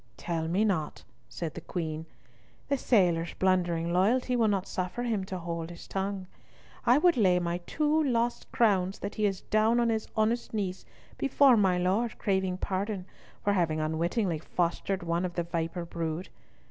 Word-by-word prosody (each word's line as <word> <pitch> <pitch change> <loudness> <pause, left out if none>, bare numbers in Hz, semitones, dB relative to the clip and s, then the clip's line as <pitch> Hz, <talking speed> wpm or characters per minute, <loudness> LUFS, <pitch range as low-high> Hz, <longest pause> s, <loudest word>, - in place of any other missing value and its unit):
"Tell 165 -2 -2
me 190 +6 +2
not," 160 -8 -1 0.3
said 165 -3 -5
the - - -7
Queen. 160 -2 -4 0.6
"The 280 - +2
sailor's 175 -9 +2
blundering 175 -3 +1
loyalty 245 +7 +2
will 230 -2 +3
not 195 -2 +1
suffer 185 +6 -3
him 220 -5 0
to 190 -1 -5
hold 170 -1 -4
his 175 - -10
tongue. 195 0 -3 0.6
I 245 +3 +7
would 340 -1 +4
lay 185 -5 +4
my 175 0 -1
two 305 0 +2
lost 240 -3 0
crowns 195 -4 +2
that 200 - -5
he 215 -1 +1
is 195 -2 -3
down 220 +3 +2
on 235 -1 +2
his 220 -1 -1
honest 225 +1 0
knees 190 -3 -3 0.3
before 275 -1 +5
my 190 -4 +3
Lord 195 +6 0
craving 190 -2 0
pardon 195 0 -2 0.4
for 205 - +2
having 165 -5 +1
unwittingly 165 +3 0
fostered 180 +3 -1
one 170 +1 0
of 175 -1 -3
the 175 - 0
viper 170 0 -3
brood. 165 +1 -4
190 Hz, 170 wpm, -29 LUFS, 170-220 Hz, 0.6 s, I